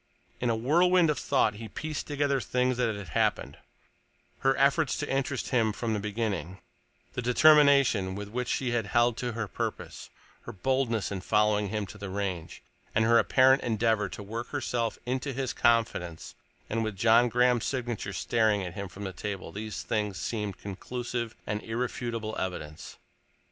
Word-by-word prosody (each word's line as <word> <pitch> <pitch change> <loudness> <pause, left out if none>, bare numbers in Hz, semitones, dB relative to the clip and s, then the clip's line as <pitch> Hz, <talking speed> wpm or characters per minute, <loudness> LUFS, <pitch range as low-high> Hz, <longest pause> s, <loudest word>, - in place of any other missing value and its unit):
In 120 - 0
a 115 - +2
whirlwind 170 +7 +4
of 150 - -3
thought 130 -6 +2
he 110 +2 -8
pieced 155 +6 -5
together 140 -2 0
things 125 +1 0
that 115 -4 +1
had 100 -4 -8
happened: - - 0 0.8
her 135 0 +2
efforts 140 +2 +3
to 145 - -3
interest 135 -1 -1
him 115 -3 +2
from 110 +1 -2
the 105 - -1
beginning, 100 -5 -3 0.6
the - - -3
determination 140 -7 +5
with 100 0 -5
which 125 +2 -3
she 125 -1 -1
had 115 -3 0
held 120 +2 +3
to 120 -2 -3
her 115 -1 -3
purpose, 90 - -5 0.4
her - - -6
boldness 115 0 0
in 95 -2 -3
following 105 0 +2
him 105 0 -2
to 105 - -12
the 100 -1 -6
Range, 95 -4 -4 0.3
and 110 - +4
her 115 +1 +6
apparent 130 +1 +5
endeavor 110 -3 +1
to 105 - -8
work 115 +4 -5
herself 120 -5 -2
into 130 +2 -2
his 130 -1 -2
confidence—and 115 -1 -1
with 110 -2 -3
John 115 +4 +5
Graham's 125 0 +3
signature 120 -6 -3
staring 110 +1 +1
at 90 -2 -5
him 100 +1 -5
from 95 +3 -10
the 95 -1 -4
table 100 +1 -5
these 110 +1 -5
things 105 -3 -1
seemed 105 -4 -3
conclusive 120 +3 -5
and 105 0 -2
irrefutable 115 -1 -3
evidence. 75 -5 -6
115 Hz, 165 wpm, -28 LUFS, 105-125 Hz, 0.8 s, her